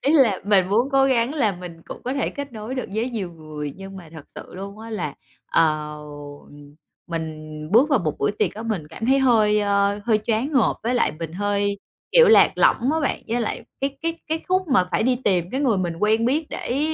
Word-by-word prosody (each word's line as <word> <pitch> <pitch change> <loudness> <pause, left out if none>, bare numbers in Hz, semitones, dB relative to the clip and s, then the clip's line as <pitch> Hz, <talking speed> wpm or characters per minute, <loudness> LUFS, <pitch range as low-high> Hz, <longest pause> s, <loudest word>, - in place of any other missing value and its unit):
Ý 285 - +3
là 230 -10 +4
mình 195 -3 +3
muốn 235 +7 +2
cố 270 0 +5
gắng 260 +1 +1
là 225 -9 +2
mình 175 -2 -10
cũng - - -9
có 255 - -2
thể 275 - 0
kết 285 -2 -7
nối 220 +4 -6
được 255 - -4
với 230 +4 -1
nhiều 195 -7 -4
người, 155 -2 -7
nhưng 195 0 -9
mà 175 -4 -11
thật 155 -3 -10
sự - - -11
luôn 200 +2 -8
á 225 +1 -9
là, 175 -9 -3 0.3
ờ, 155 -2 +1 1.1
mình 160 -2 -5 0.2
bước 245 +8 +5
vào 275 - +4
một 155 -5 -3
buổi 140 - +1
tiệc - - 0
á 220 - -6
mình 205 -10 -3
cảm 225 +9 -6
thấy 270 +1 +4
hơi, 215 -5 +4
à, 200 0 +1
hơi 220 -2 +3
choáng 235 +7 0
ngợp, 260 -5 +3
với 240 +3 0
lại 245 - +2
mình 165 -1 -5
hơi, 200 +1 0 0.3
kiểu, 485 -2 +7
lạc 445 - +7
lõng 260 +6 +3
á 320 - 0
bạn. 280 - -1
Với 240 +1 0
lại 230 +1 -3 0.2
cái 275 0 -2
cái 330 0 -2
cái 320 +1 -1
khúc 370 -2 +1
mà 250 -9 +4
phải - - +1
đi 250 +1 +2
tìm 180 -3 +1
cái 265 - -2
người 240 -8 +2
mình 175 -3 -2
quen 220 +2 +2
biết 295 +5 +1
để 250 - -3
215 Hz, 230 wpm, -23 LUFS, 180-260 Hz, 1.1 s, kiểu